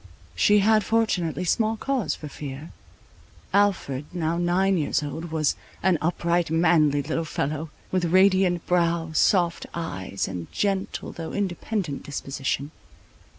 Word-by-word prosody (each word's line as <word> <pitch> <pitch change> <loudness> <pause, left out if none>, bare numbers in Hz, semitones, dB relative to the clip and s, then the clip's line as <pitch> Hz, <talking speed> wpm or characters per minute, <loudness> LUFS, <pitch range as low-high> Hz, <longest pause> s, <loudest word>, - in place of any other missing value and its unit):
She 205 - +4
had 215 -1 +4
fortunately 185 -7 0
small 220 +5 +1
cause 265 -2 -1
for 150 - -8
fear. 145 +1 -8 0.8
Alfred, 190 -9 +1
now 170 -2 -1
nine 185 +3 +2
years 150 -1 0
old, 150 +3 -5
was 155 -3 0 0.3
an 180 -4 +3
upright, 170 0 +1
manly 160 -3 +3
little 160 +3 -2
fellow, 155 0 -3 0.2
with 185 -2 +1
radiant 185 0 +3
brow, 170 -2 +1
soft 170 +1 +2
eyes, 100 - -3
and 90 -3 -6
gentle, 195 -2 -2
though 165 -1 -7
independent 190 -4 -2
disposition. 140 0 -3
170 Hz, 125 wpm, -25 LUFS, 150-190 Hz, 0.8 s, She